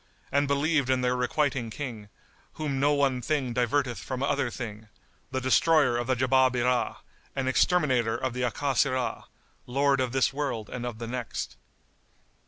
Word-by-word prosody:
and 140 +1 +2
believed 140 -1 +1
in 130 -1 +2
the 125 0 +2
Requiting 125 -1 0
King, 110 -5 -6 0.4
whom 145 -3 -2
no 145 +2 +3
one 140 -3 +2
thing 135 -2 -1
diverteth 125 +1 0
from 130 0 -4
other 140 -2 +1
thing, 110 -3 -7 0.4
the 130 - -2
Destroyer 140 +1 +4
of 120 0 -2
the 130 - +2
Jabábirah[FN#74] 125 -1 +2 0.4
and 135 -1 -1
Exterminator 130 -6 +2
of 130 -2 -2
the 125 - -3
Akásirah, 130 +1 0 0.4
Lord 135 +1 +2
of 130 -2 -1
this 135 +1 +2
world 135 -7 -3
and 125 -1 -4
of 120 -3 -5
the 115 - -5
next. 120 -1 -4
130 Hz, 155 wpm, -27 LUFS, 120-140 Hz, 0.4 s, Destroyer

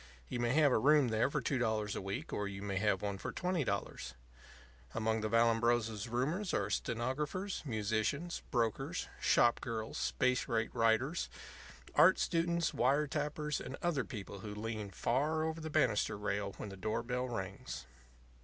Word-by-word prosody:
You 125 - -3
may 120 0 +1
have 150 -2 +5
a - - +4
room 145 +1 +5
there 110 +4 +2
for 145 0 -1
two 130 +2 0
dollars 110 -3 0
a - - -3
week 95 +1 -4
or 105 - -1
you 100 0 -6
may 100 -1 -2
have 100 -1 +1
one 100 -1 -2
for - - -4
twenty 180 -3 0
dollars. 65 - -3 0.8
Among 110 0 +1
the 110 - -1
Vallambrosa's 115 -1 +2
roomers 155 - 0
are - - 0
stenographers, 150 - -2
musicians, 110 +9 -1
brokers, 115 -3 -1
shop 120 -1 +4
girls, 110 -1 -4
space 125 0 +1
rate 115 -1 0
writers, 120 +7 +2 0.6
art - - +7
students, 170 0 +1
wire 140 +5 +3
tappers, 150 0 -2
and 135 - -6
other 165 -7 +1
people 100 -5 -7
who 105 +1 -6
lean 110 -1 -4
far 145 +10 0
over 160 0 -2
the 160 - -4
banister 105 -8 +2
rail 100 -1 -2
when 105 - -6
the 95 - -8
door 110 +4 -1
bell 125 +1 -2
rings. 95 - -5
120 Hz, 165 wpm, -34 LUFS, 110-145 Hz, 0.8 s, art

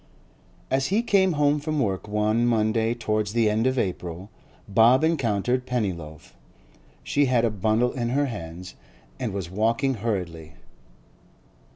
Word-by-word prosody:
As 135 0 +1
he 210 +5 +1
came 190 -5 +3
home 145 0 +2
from 155 0 -2
work 100 -6 -1
one 105 +2 +1
Monday 115 0 +1
towards 110 -2 -1
the 115 -2 +2
end 110 +3 +1
of 130 0 0
April, 90 -1 -3 0.4
Bob 115 +7 +5
encountered 125 -5 0
Pennyloaf; 90 -11 -4 0.7
she 145 0 +1
had 125 -3 +2
a 115 - +1
bundle 110 +4 +1
in 120 -2 -3
her 140 +4 +1
hands 90 -6 -7 0.5
and - - -2
was 95 -3 -5
walking 115 +7 +1
hurriedly. 90 -8 -4
115 Hz, 140 wpm, -25 LUFS, 100-130 Hz, 0.7 s, Bob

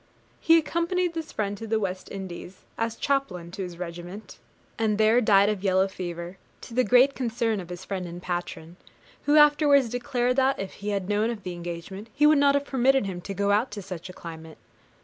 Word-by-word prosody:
He 330 0 +5
accompanied 340 +2 0
this 325 -2 -5
friend 205 -1 -2
to 225 - -6
the 220 0 +1
West 190 -2 -4
Indies, 190 -1 -8
as 225 0 -2
chaplain 215 -12 -2
to 195 - -6
his 180 -2 -6
regiment, 175 +3 -8 0.4
and 215 -2 +1
there 220 +3 +4
died 200 -3 +5
of 205 -2 -1
yellow 190 0 +3
fever, 175 -1 -6 0.2
to 235 - -10
the 255 +2 +3
great 250 +5 +5
concern 230 -4 -1
of 180 -2 -8
his 180 +1 -8
friend 185 -3 -4
and 175 +1 -8
patron, 175 -1 -5 0.5
who 295 +1 +4
afterwards 290 -3 +5
declared 245 +1 -1
that, 270 0 +3
if 195 -1 -5
he 205 +1 -6
had 200 -3 -2
known 210 +2 +1
of 225 -4 -5
the 180 - -5
engagement, 175 +5 -7
he 295 - +4
would 300 -1 +6
not 280 0 +4
have 285 0 0
permitted 265 -2 +2
him 180 -2 -5
to 195 +2 -6
go 200 +1 +1
out 215 +5 +2
to 205 -1 -7
such 180 0 -7
a - - -9
climate. 160 -2 -10
205 Hz, 205 wpm, -26 LUFS, 180-255 Hz, 0.5 s, would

